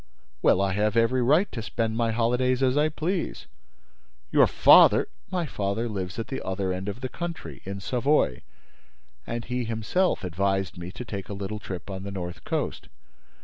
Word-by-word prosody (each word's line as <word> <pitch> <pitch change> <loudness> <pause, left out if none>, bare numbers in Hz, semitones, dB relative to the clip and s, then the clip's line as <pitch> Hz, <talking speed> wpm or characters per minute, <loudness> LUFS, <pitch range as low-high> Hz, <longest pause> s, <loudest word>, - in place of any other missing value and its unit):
"Well, 95 - +4
I 100 -1 +1
have 105 +3 +1
every 115 +3 +3
right 155 +11 +3
to 115 - -4
spend 110 0 -2
my 115 0 +1
holidays 125 +3 +1
as 130 0 +3
I 150 +1 +3
please." 165 +4 -3 0.9
"Your - - +6
father—" - - +7 0.2
"My 180 -2 -1
father 105 -2 -2
lives 95 -4 -4
at 115 - -4
the 135 - -4
other 95 0 -1
end 95 +2 -4
of 105 +5 -6
the 130 - -2
country, 170 +5 -6
in 100 +1 -5
Savoy, 125 - +1 0.9
and 115 0 -4
he 125 0 -2
himself 115 - 0
advised 95 +1 -1
me 85 +1 -7
to 125 - -8
take 100 -4 -6
a - - -4
little 100 +2 -5
trip 95 -1 -7
on 95 0 -5
the 100 - -6
North 90 -3 -6
Coast." - - -3
110 Hz, 180 wpm, -26 LUFS, 95-130 Hz, 0.9 s, father